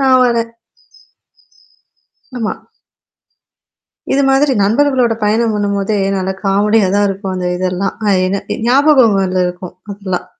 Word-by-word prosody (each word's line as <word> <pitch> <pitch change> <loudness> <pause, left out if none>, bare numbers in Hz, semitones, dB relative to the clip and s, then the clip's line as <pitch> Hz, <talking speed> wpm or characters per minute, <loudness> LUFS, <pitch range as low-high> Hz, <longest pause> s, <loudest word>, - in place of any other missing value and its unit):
நான் 260 -1 +4
வரேன். 230 -1 -1 1.9
ஆமா. 220 -2 -2 1.6
இது 280 - +2
மாதிரி 270 +1 +2
நண்பர்களோட 250 +3 +2
பயணம் 220 +2 +1
பண்ணும்போதே 200 0 -1 0.2
நல்லா 190 0 -2
காமெடியா 205 +1 +2
தான் 205 0 +2
இருக்கும் 195 -1 -4
அந்த 180 -1 -2
இதெல்லாம். 185 +1 -2
அ - - +2 0.2
என்ன 195 +1 -2 0.2
ஞாபகங்கள்ல 230 -10 +3
இருக்கும். 180 0 -7 0.2
அதெல்லாம். 190 -3 -5
205 Hz, 110 wpm, -15 LUFS, 190-235 Hz, 1.9 s, நான்